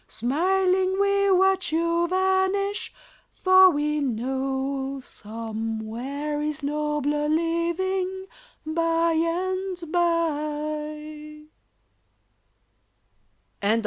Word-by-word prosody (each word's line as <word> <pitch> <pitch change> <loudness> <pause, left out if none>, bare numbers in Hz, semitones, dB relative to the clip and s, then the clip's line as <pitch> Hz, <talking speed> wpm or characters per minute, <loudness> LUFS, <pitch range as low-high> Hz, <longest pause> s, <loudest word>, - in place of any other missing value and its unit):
Smiling 370 - +1
we 400 0 +3
watch 380 -1 +3
you 335 +1 +1
vanish, 380 +2 +1 0.4
for 375 0 +6
we 300 -1 0
know 270 +2 -2
Somewhere 225 +6 -5
is 300 0 -3
nobler 295 0 -1
living 355 +4 -1 0.4
by 330 +1 +1
and 370 +3 -1
by. 305 -2 -2
315 Hz, 65 wpm, -25 LUFS, 290-370 Hz, 0.4 s, for